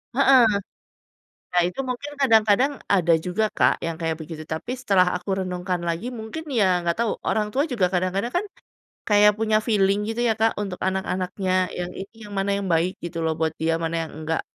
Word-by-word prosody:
Heeh. 270 Hz, -1 st, +6 dB, 1.1 s
Nah, 175 Hz, -, +4 dB
itu 180 Hz, -, -7 dB
mungkin 255 Hz, +4 st, -4 dB
kadang-kadang, 230 Hz, 0 st, +4 dB, 0.2 s
ada 175 Hz, -4 st, +4 dB
juga 205 Hz, +5 st, -1 dB
Kak, -, -, +3 dB
yang 165 Hz, 0 st, -4 dB
kayak 160 Hz, -1 st, -1 dB
begitu. 160 Hz, 0 st, -8 dB
Tapi, 160 Hz, +11 st, -4 dB
setelah 195 Hz, -8 st, +2 dB
aku 185 Hz, +2 st, -2 dB
renungkan 180 Hz, 0 st, -2 dB
lagi, 170 Hz, +9 st, -2 dB
mungkin 250 Hz, +7 st, -7 dB
ya 190 Hz, -8 st, +2 dB
ga 170 Hz, +2 st, -1 dB
tau, 230 Hz, -2 st, -1 dB
orang 210 Hz, -1 st, -1 dB
tua 290 Hz, +4 st, +1 dB
juga 215 Hz, -8 st, +1 dB
kadang-kadang 185 Hz, +6 st, -1 dB
kan. 365 Hz, +4 st, 0 dB, 0.6 s
Kayak 210 Hz, 0 st, +6 dB
punya 215 Hz, -1 st, +3 dB
feeling 205 Hz, -2 st, +2 dB
gitu 225 Hz, +2 st, -3 dB
ya 225 Hz, -2 st, +2 dB
Kak, 220 Hz, -1 st, +1 dB
untuk 195 Hz, -3 st, -3 dB
anak-anaknya, 185 Hz, 0 st, -1 dB
yang 175 Hz, 0 st, -4 dB
ini, 195 Hz, +3 st, -8 dB
yang 210 Hz, -3 st, -10 dB
mana 195 Hz, +1 st, 0 dB
yang 195 Hz, -, -4 dB
baik 170 Hz, +2 st, 0 dB
gitu 165 Hz, -1 st, -4 dB
loh 160 Hz, -, +1 dB
buat 160 Hz, 0 st, 0 dB
dia, 165 Hz, +1 st, 0 dB
mana 165 Hz, 0 st, -2 dB
yang -, -, -13 dB
enggak. 160 Hz, +1 st, -2 dB
195 Hz, 190 wpm, -24 LUFS, 175-225 Hz, 1.1 s, Heeh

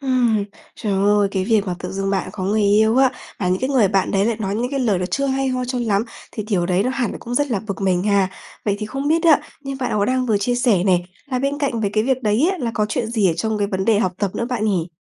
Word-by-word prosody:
Ừm. 245 Hz, -6 st, +2 dB, 0.3 s
Trời 210 Hz, -3 st, -3 dB
ơi, 200 Hz, +1 st, +3 dB
cái 190 Hz, -2 st, -1 dB
việc 210 Hz, -1 st, +2 dB
mà 180 Hz, -, -1 dB
tự 180 Hz, -, -6 dB
dưng 195 Hz, 0 st, -2 dB
bạn 195 Hz, -2 st, -1 dB
có 185 Hz, -, -5 dB
người 210 Hz, +2 st, +1 dB
yêu 215 Hz, +3 st, +4 dB
á, 265 Hz, -1 st, +5 dB, 0.3 s
và 180 Hz, -, -1 dB
những 185 Hz, +4 st, 0 dB
cái 260 Hz, +2 st, -1 dB
người 235 Hz, -8 st, +4 dB
bạn 195 Hz, -1 st, +1 dB
đấy 195 Hz, 0 st, +2 dB
lại 230 Hz, -2 st, 0 dB
nói 200 Hz, -1 st, -2 dB
những 245 Hz, +4 st, -1 dB
cái 275 Hz, -1 st, -1 dB
lời 210 Hz, -7 st, +2 dB
nó 180 Hz, -, -2 dB
chưa 275 Hz, +9 st, -1 dB
hay 270 Hz, 0 st, 0 dB
ho 255 Hz, -1 st, -1 dB
cho 250 Hz, 0 st, -3 dB
lắm, 210 Hz, -1 st, +1 dB, 0.3 s
thì 215 Hz, -, -4 dB
điều 195 Hz, -5 st, 0 dB
đấy 185 Hz, +2 st, +2 dB
nó 255 Hz, -, 0 dB
hẳn 250 Hz, -4 st, -1 dB
là -, -, -6 dB
cũng 240 Hz, +1 st, -5 dB
rất 290 Hz, +1 st, +1 dB
là 205 Hz, -5 st, 0 dB
bực 200 Hz, -1 st, -4 dB
mình 185 Hz, -2 st, +2 dB
ha. 200 Hz, -2 st, +2 dB, 0.4 s
Vậy 205 Hz, -1 st, +1 dB
thì 215 Hz, -, -4 dB
không 275 Hz, +5 st, -3 dB
biết 330 Hz, +1 st, +2 dB
á, 315 Hz, -3 st, +6 dB, 0.2 s
như 275 Hz, -1 st, -5 dB
bạn 250 Hz, -, -1 dB
có 200 Hz, -, +2 dB
đang 255 Hz, +2 st, 0 dB
vừa 210 Hz, -3 st, +2 dB
chia 245 Hz, +5 st, 0 dB
sẻ 230 Hz, -7 st, +2 dB
này, 180 Hz, -2 st, +2 dB, 0.2 s
là 255 Hz, -2 st, -2 dB
bên 280 Hz, +2 st, -1 dB
cạnh 270 Hz, -6 st, -1 dB
với 200 Hz, -2 st, 0 dB
cái 215 Hz, +1 st, +1 dB
việc 260 Hz, -1 st, 0 dB
đấy 220 Hz, -, +2 dB
á 370 Hz, -, -6 dB
là 235 Hz, -4 st, -2 dB
có 210 Hz, -2 st, +1 dB
chuyện 220 Hz, +2 st, -1 dB
gì 215 Hz, -5 st, +2 dB
ở 170 Hz, -, +3 dB
trong 215 Hz, +6 st, -2 dB
cái 200 Hz, -, +1 dB
vấn 190 Hz, -1 st, -2 dB
đề 220 Hz, -2 st, +3 dB
học 185 Hz, -4 st, +1 dB
tập 200 Hz, -3 st, 0 dB
nữa 235 Hz, -, -2 dB
bạn 235 Hz, -4 st, -1 dB
nhỉ? 185 Hz, -5 st, 0 dB
215 Hz, 310 wpm, -20 LUFS, 195-255 Hz, 0.4 s, á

